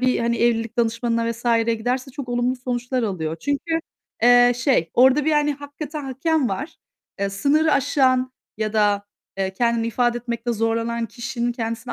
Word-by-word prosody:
bir, 255 0 +2
hani, 235 0 0
evlilik 230 -1 +1
danışmanına 230 0 0
vs.'ye 230 0 +1
giderse 250 +4 -2
çok 260 -2 -7
olumlu 245 +1 0
sonuçlar 245 0 -2
alıyor. 165 -7 -2
Çünkü, 325 +3 -1 0.4
eee, 245 0 +6
şey, 245 - +1
orada 265 +4 +5
bir 315 - +2
hani 295 0 +2
hakikaten 290 +1 -7
hakem 275 +1 0
var. 265 - -5 0.4
Eee, 200 0 -1
sınırı 295 +10 +2
aşan 255 -1 +2 0.2
ya 215 0 -2
da, 205 -2 +2 0.3
eee, 190 -1 -1
kendini 235 +2 +1
ifade 240 +1 +1
etmekte 235 0 -3
zorlanan 230 +1 -1
kişinin 240 +1 -3
kendisini 230 0 -4
240 Hz, 155 wpm, -22 LUFS, 230-260 Hz, 0.4 s, eee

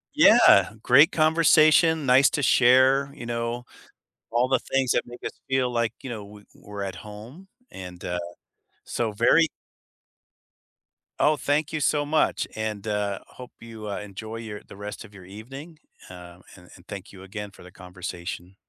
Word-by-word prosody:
Yeah, - - +6
great 145 +7 +6
conversation, 160 -1 +4
nice 130 +2 +5
to 150 - -2
share, 130 +3 +4
you - - -9
know, 120 +1 -4 0.7
all 120 +2 +2
the 130 0 +2
things 135 -2 -1
that - - 0
make 120 0 -11
us - - -4 0.2
feel 130 -1 +1
like, 115 -2 -1
you 130 - -7
know, 110 -3 -6
we 105 0 -14
we're 100 -1 -9
at 95 -1 -5
home, 115 - -12 0.2
and, 90 -1 -10
uh, 90 0 -3 0.6
so 115 -2 -3
very 120 +10 +3 1.7
Oh, 150 0 +3
thank 145 +2 -1
you 155 - -2
so 145 0 +1
much, 155 +1 0
and, 110 -1 -4
uh, 105 -2 -2
hope 125 -1 -12
you, 110 -2 -9
uh, 100 - -4
enjoy 110 +2 -8
your 110 -2 -8
the - - -12
rest 105 +1 -8
of 100 - -17
your 95 -2 -13
evening, 135 - -11 0.3
uh, 90 -1 -12 0.2
and 90 -1 -17
and 90 -1 -19
thank 100 -1 -8
you 95 -2 -13
again 105 +1 -8
for - - -17
the 90 - -14
conversation. 90 0 -8
115 Hz, 165 wpm, -25 LUFS, 100-135 Hz, 1.7 s, Yeah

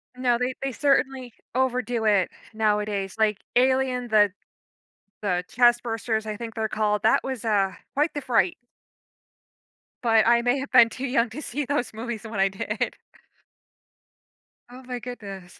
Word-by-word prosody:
No, 250 -1 +1
they 250 +1 -1
they 270 - -1
certainly 265 -2 0 0.2
overdo 245 -3 0
it 200 -4 +3 0.2
nowadays, 210 -3 0
like 215 -2 +2 0.2
Alien, 255 0 +2
the 210 -2 +5 0.9
the 180 -4 -1
chestbursters, 235 -2 +1
I 215 -1 -4
think 230 0 -7
they're 220 -1 -1
called, 210 -1 0
that 220 - +4
was, 260 -4 -5
uh, 200 -3 +2 0.2
quite 295 +4 +1
the 290 - -3
fright. 230 -9 +2 1.5
But 225 -2 +4
I 235 0 +5
may 245 +3 +1
have 275 - -6
been 240 -3 +7
too 260 +4 -5
young 245 -2 +1
to 300 - -6
see 290 0 -3
those 275 -3 -1
movies 230 0 -5
when 220 -2 -5
I 195 - +4
did. 195 +4 -3 1.7
Oh 250 +1 -11
my 250 -1 -5
goodness. 200 -7 -9
235 Hz, 150 wpm, -25 LUFS, 215-255 Hz, 1.7 s, been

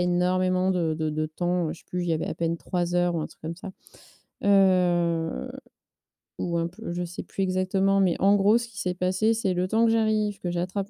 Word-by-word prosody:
énormément 185 +1 +1
de 170 -4 0
de 155 0 -2
de 155 +1 -1
temps, 175 +1 -1
je - - -16
sais - - -26
plus, 180 - -3
il 175 - -3
y 165 - +2
avait 155 - -2
à - - -3
peine 170 0 -1
3 175 0 -2
heures 175 -1 +2
ou - - -1
un - - -3
truc - - -20
comme 165 +1 -5
ça. 190 +1 -8 0.7
Heu, 175 - +2 0.9
ou 170 -1 -1
un 165 0 0
peu 170 0 -8
je 175 0 -2
sais 175 - -7
plus 195 - -3
exactement. 190 +1 +1
Mais 185 -3 +3
en 200 +1 +5
gros, 205 +3 +4
ce 235 0 -4
qui 205 -4 -11
s'est 180 -1 -2
passé, 185 +5 +1
c'est: 195 -5 0
le 180 +1 0
temps 225 +3 +2
que 225 - +3
j'arrive, 215 -2 +1
que 175 - -3
j'attrape 185 +3 -3
180 Hz, 230 wpm, -26 LUFS, 175-195 Hz, 0.9 s, en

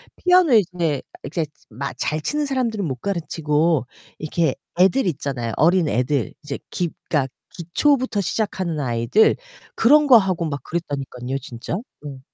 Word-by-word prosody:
피아노 360 -5 +4
이제 175 - +2 0.2
이렇게 155 +3 -2 0.2
막 130 +5 -4
잘 155 +1 -1
치는 295 - -1
사람들은 240 -7 -1
못 135 -5 -2
가르치고 160 -4 0 0.3
이렇게 155 -2 0 0.2
애들 195 +9 +4
있잖아요 135 -7 -2
어린애들. 150 -6 +2
이제 145 -2 -4
기 175 -2 -1 0.2
그러니까 145 -4 +2 0.2
기초부터 245 - +1
시작하는 185 -3 -2
아이들. 120 - +3 0.4
그런 295 +6 +5
거 260 - +8
하고 185 -5 0
막 145 -4 -3
그랬다니깐요 135 -6 -4
진짜. 120 +4 -6 0.3
음. 140 -2 -7
165 Hz, 325 characters per minute, -22 LUFS, 140-200 Hz, 0.4 s, 거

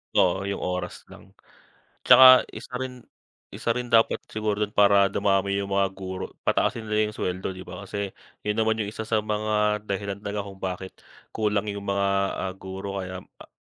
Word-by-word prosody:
Oo, 95 +2 +3
yung 100 - -3
oras 90 -1 -4
lang. - - -15 0.7
Tsaka 130 -1 +9
isa - - -9
rin 125 -2 -6 0.5
isa 115 - -2
rin 125 +1 -4
dapat 115 -1 +3
siguro 105 -1 -2
dun 105 -1 0
para 100 -1 +6
dumami 100 0 +1
yung 100 0 -3
mga 100 0 +3
guro, 95 -1 -5 0.2
pataasin 115 - +1
nila 105 0 +1
'yong 105 - -9
suweldo, 90 +1 -2
'di 95 - -9
ba? - - -8
Kasi 100 0 -4 0.3
yun 105 0 0
naman 110 0 +2
yung 105 - -1
isa 110 - -5
sa 110 - +2
mga 105 0 0
dahilan 100 0 -3
talaga 100 0 -4
kung 95 -1 -11
bakit 95 0 -4 0.4
kulang 105 -1 0
yung 100 0 -7
mga, 100 0 +1 0.4
ah, 95 - -3
guro 95 +1 -6
kaya, 95 0 -7 0.2
ah, - - -13
100 Hz, 180 wpm, -25 LUFS, 95-105 Hz, 0.7 s, Tsaka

